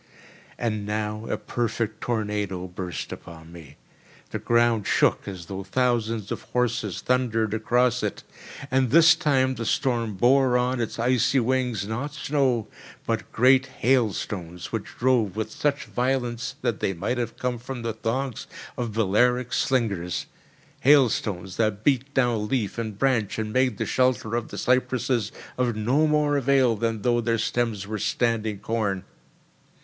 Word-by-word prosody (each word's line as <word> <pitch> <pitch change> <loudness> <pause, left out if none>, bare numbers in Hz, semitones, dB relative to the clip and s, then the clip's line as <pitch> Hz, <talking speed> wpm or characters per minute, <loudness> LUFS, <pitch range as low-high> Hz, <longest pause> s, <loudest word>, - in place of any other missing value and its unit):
And 110 -3 -2
now 105 +1 -3
a - - 0
perfect 115 -2 -3
tornado 105 -5 -2
burst 90 -1 -6
upon 80 -1 -10
me. 85 -4 -13 0.5
The - - -3
ground 115 -3 +2
shook - - +2
as 95 -4 -6
though 95 +2 -5
thousands 115 -1 0
of - - -3
horses 115 -5 -1
thundered 115 -4 +1
across 120 +2 +2
it; 105 - -3 0.5
and 130 -1 +2
this 165 +5 +7
time 130 -3 +2
the 120 - -5
storm 115 -6 0
bore 125 +4 +4
on 125 0 0
its 115 - -3
icy 125 +3 +2
wings, 125 -4 0
not 135 +7 -4
snow, 135 -6 0 0.4
but - - -2
great 130 +3 +4
hailstones 100 -8 -1
which 115 -3 -3
drove 115 -6 +2
with 110 0 -3
such 145 -1 -1
violence 125 -1 -1
that 120 -4 0
they 95 - 0
might 120 +8 -2
have 115 -1 -3
come 125 -1 -2
from 125 0 -6
the 115 -1 -2
thongs 120 +3 -3 0.3
of 120 -3 -3
Balearic 120 +4 +2
slingers—hailstones 105 0 0
that 110 -2 0
beat 140 -1 +1
down 120 -5 +1
leaf 115 -3 -1
and 110 -3 -4
branch 120 -4 +1
and 110 -1 -3
made 130 -4 +2
the - - -1
shelter 125 -3 +1
of 120 -1 -2
the - - -8
cypresses 125 -3 +1 0.3
of 120 -3 +1
no 130 +9 +2
more 150 -1 +2
avail 135 -3 +3
than 110 -1 -2
though 120 -1 +2
their 115 0 +1
stems 115 -2 -1
were 105 +1 -4
standing 110 -1 0
corn. 100 -3 -2
115 Hz, 150 wpm, -25 LUFS, 105-125 Hz, 0.5 s, this